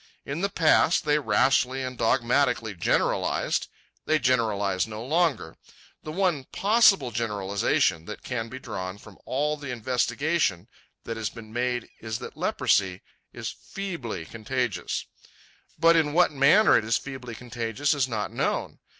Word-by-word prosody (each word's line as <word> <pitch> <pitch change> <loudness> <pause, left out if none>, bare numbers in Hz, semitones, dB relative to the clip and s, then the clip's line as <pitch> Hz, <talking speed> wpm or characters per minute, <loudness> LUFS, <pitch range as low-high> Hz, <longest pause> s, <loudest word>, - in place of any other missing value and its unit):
In 140 +5 -4
the 200 - +1
past 165 -2 +3
they 150 0 +3
rashly 130 +2 +2
and 130 0 -4
dogmatically 120 -1 +1
generalized. 85 - 0 0.4
They 155 - +4
generalize 110 -8 +1
no 110 +1 -7
longer. 155 - 0 0.4
The 155 - -7
one 170 -6 0
possible 200 - +4
generalization 100 -7 0
that 105 - -8
can 115 -3 -3
be 130 - -7
drawn 95 -6 -6
from 105 -2 -15
all 150 +3 0
the 145 -2 -8
investigation 125 - 0 0.4
that 115 -1 -5
has 110 -3 -2
been 110 -2 -12
made 125 -1 -1
is 110 -1 -4
that - - -9
leprosy 95 -1 +1 0.3
is - - -5
feebly 135 - -6
contagious. 115 +3 -3 0.7
But 165 +1 +5
in 150 -3 +2
what 175 +1 +4
manner 150 +10 +5
it - - +3
is 115 +1 +1
feebly 130 -4 -8
contagious 120 +4 -2
is 140 -3 +1
not 110 -4 -3
known. - - -2
125 Hz, 140 wpm, -26 LUFS, 110-150 Hz, 0.7 s, But